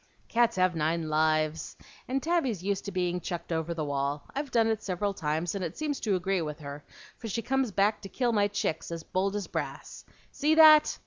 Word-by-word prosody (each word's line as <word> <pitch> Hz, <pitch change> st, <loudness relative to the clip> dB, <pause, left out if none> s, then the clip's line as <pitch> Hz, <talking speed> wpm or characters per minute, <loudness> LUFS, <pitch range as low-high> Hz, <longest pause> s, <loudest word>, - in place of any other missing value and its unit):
"Cats 235 Hz, 0 st, +3 dB
have 185 Hz, -1 st, +2 dB
nine 160 Hz, +1 st, 0 dB
lives, 155 Hz, 0 st, +1 dB, 0.3 s
and 265 Hz, +1 st, -1 dB
Tabby's 275 Hz, -, 0 dB
used 200 Hz, 0 st, -1 dB
to 200 Hz, -, -4 dB
being 180 Hz, -1 st, -1 dB
chucked 175 Hz, 0 st, -5 dB
over 160 Hz, 0 st, -1 dB
the 155 Hz, -2 st, -2 dB
wall. 140 Hz, 0 st, -2 dB
I've 285 Hz, +1 st, -3 dB
done 230 Hz, -2 st, +3 dB
it 220 Hz, -1 st, 0 dB
several 200 Hz, +1 st, -2 dB
times, 160 Hz, -1 st, -2 dB
and 195 Hz, -2 st, -3 dB
it 170 Hz, 0 st, -5 dB
seems 300 Hz, -2 st, -2 dB
to 205 Hz, -4 st, 0 dB
agree 185 Hz, 0 st, 0 dB
with 150 Hz, -2 st, -4 dB
her, 145 Hz, 0 st, -8 dB, 0.4 s
for 230 Hz, -, -6 dB
she 225 Hz, +2 st, -3 dB
comes 265 Hz, -1 st, 0 dB
back 205 Hz, +3 st, +1 dB
to 195 Hz, -, -8 dB
kill 245 Hz, +1 st, 0 dB
my 205 Hz, -2 st, +3 dB
chicks 200 Hz, -5 st, -2 dB
as 165 Hz, -1 st, -5 dB
bold 195 Hz, +4 st, -1 dB
as 205 Hz, -2 st, -2 dB
brass. -, -, -6 dB, 0.3 s
See 310 Hz, +2 st, +2 dB
that!" 310 Hz, -1 st, +7 dB
190 Hz, 210 wpm, -29 LUFS, 160-230 Hz, 0.4 s, that